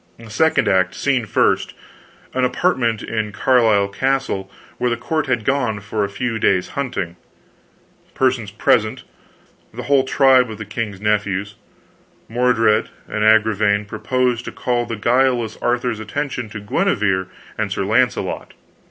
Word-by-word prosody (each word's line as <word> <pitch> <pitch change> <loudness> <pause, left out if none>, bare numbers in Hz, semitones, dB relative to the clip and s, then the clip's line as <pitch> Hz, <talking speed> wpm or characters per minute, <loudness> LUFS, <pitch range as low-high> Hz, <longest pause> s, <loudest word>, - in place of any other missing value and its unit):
Act 115 -2 -12
second, 95 -10 +2
scene 130 -5 0
first, - - +1 0.6
an 130 - 0
apartment 125 - +1
in 110 -2 -3
Carlisle 110 -3 +3
castle, 130 -3 -1 0.3
where 125 - +1
the 120 - -1
court 155 +6 -2
had 120 -4 -1
gone 125 -7 0
for 105 +1 -3
a 100 - -2
few 115 +2 -3
days' 90 -3 +2
hunting. 100 -11 -4 1.0
Persons 130 -5 +1
present, 110 0 +1 0.7
the - - -7
whole 140 -2 +3
tribe 130 -2 +4
of 110 - -7
the 110 - -7
king's 105 -1 -4
nephews. 105 -1 -1 0.7
Mordred 115 -2 +2 0.2
and 105 - -2
Agravaine 110 -1 +3
propose 125 +3 -1
to - - -7
call 120 -1 -1
the 115 - -3
guileless 120 0 +1
Arthur's 120 -2 0
attention 125 +2 -4
to 110 - -7
Guenever 100 -2 0 0.3
and 110 -3 -2
Sir 95 - -1
Launcelot. 125 +5 0
110 Hz, 135 wpm, -20 LUFS, 105-125 Hz, 1.0 s, tribe